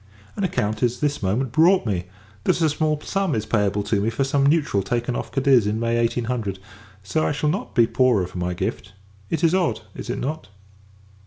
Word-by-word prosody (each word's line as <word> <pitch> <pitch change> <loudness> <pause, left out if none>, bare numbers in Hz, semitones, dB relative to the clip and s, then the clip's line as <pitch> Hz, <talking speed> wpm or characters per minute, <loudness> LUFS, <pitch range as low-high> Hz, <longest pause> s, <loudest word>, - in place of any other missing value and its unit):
An 200 - -3
account 110 - -1
is 120 0 +1
this 145 -1 -1
moment 110 +6 0
brought 170 +6 +4
me, 90 -5 -1 0.4
that - - +2
a 160 -2 +3
small 155 0 0
sum 195 -5 -1
is 110 -1 -2
payable 105 -2 +1
to 100 0 0
me, 110 - +1
for 115 +4 -1
some 140 +1 +2
neutral 145 -10 +2
taken 120 +3 -2
off - - -4
Cadiz 135 -5 +3
in 105 +1 -1
May 115 0 0
1800; 115 -3 -1 0.5
so 100 +11 -1
that - - +1
I - - +1
shall 150 +1 0
not - - -5
be 120 -3 +6
poorer 120 -6 +2
for 90 - -7
my 90 0 -2
gift. 95 +3 -4 0.4
It 165 0 -2
is 165 0 +4
odd, 170 -14 +1
is - - -8
it - - -2
not? 155 +4 -4
120 Hz, 215 wpm, -23 LUFS, 105-150 Hz, 0.5 s, be